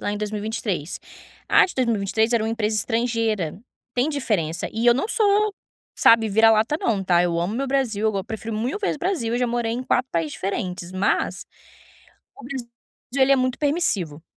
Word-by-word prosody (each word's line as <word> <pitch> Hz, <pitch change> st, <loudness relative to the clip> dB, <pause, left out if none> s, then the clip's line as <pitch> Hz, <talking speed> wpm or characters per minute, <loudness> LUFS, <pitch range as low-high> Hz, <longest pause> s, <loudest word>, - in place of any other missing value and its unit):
lá 205 Hz, -, -2 dB
em 205 Hz, -, -3 dB
2023. 210 Hz, -5 st, -3 dB, 0.5 s
A -, -, +6 dB
de 365 Hz, -, -6 dB
2023 225 Hz, -2 st, +1 dB
era 230 Hz, -2 st, +2 dB
um -, -, -1 dB
empresa 220 Hz, -1 st, -1 dB
estrangeira, 225 Hz, -7 st, -1 dB, 0.4 s
tem 250 Hz, +4 st, +1 dB
diferença 205 Hz, -, -1 dB
e 225 Hz, +2 st, -1 dB
eu 240 Hz, -, +7 dB
não 275 Hz, -, -1 dB
sou, 425 Hz, -2 st, +2 dB, 0.4 s
sabe, 225 Hz, -1 st, +5 dB
vira-lata 220 Hz, +5 st, +4 dB
não 210 Hz, -4 st, 0 dB
tá, 175 Hz, -2 st, +3 dB
eu 170 Hz, -1 st, 0 dB
amo 180 Hz, +5 st, -2 dB
o -, -, -3 dB
meu 275 Hz, -, -1 dB
Brasil, 245 Hz, -6 st, 0 dB
eu 215 Hz, -, +2 dB
go 195 Hz, -1 st, -2 dB
prefiro 220 Hz, +1 st, -5 dB
1000 250 Hz, -, -2 dB
vezes 400 Hz, -, -1 dB
Brasil, 325 Hz, -10 st, -1 dB
eu -, -, 0 dB
já 250 Hz, -, +1 dB
morei 235 Hz, -1 st, -1 dB
em 245 Hz, +2 st, -3 dB
4 255 Hz, 0 st, 0 dB
países 165 Hz, -3 st, -1 dB
diferentes, 185 Hz, -3 st, -4 dB
mas 185 Hz, +2 st, 0 dB, 1.0 s
o -, -, -11 dB
Brasil, 250 Hz, -2 st, -6 dB, 0.5 s
ele 270 Hz, +1 st, +4 dB
é -, -, +7 dB
muito 255 Hz, -1 st, 0 dB
permissivo, 205 Hz, -, -1 dB
225 Hz, 190 wpm, -23 LUFS, 200-255 Hz, 1.0 s, eu